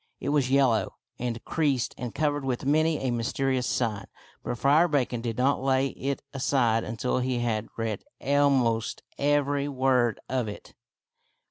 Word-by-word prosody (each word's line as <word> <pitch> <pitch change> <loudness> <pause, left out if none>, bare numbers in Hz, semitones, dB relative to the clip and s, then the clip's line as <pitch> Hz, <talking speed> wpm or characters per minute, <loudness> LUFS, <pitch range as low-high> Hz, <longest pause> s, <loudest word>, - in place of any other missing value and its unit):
It - - -3
was 145 -3 +2
yellow 130 -5 +2 0.2
and 120 -1 -4
creased 140 -6 0
and 125 -3 -6
covered 145 -2 0
with 130 -1 -2
many 155 +2 +3
a 130 -2 -1
mysterious 125 +2 0
sign, 110 -5 -1 0.4
but 120 - -3
Friar 150 +7 +4
Bacon 130 -6 0
did 115 -2 -3
not 135 +2 +2
lay 135 0 +2
it 135 +1 -4
aside 125 -4 +1
until 115 +3 -1
he 125 0 -1
had 115 -2 -1
read 110 -3 -3 0.2
almost 135 -5 +1 0.2
every 145 0 +1
word 130 -4 +1
of 125 -3 -1
it. 105 - -9
130 Hz, 150 wpm, -27 LUFS, 120-140 Hz, 0.4 s, Friar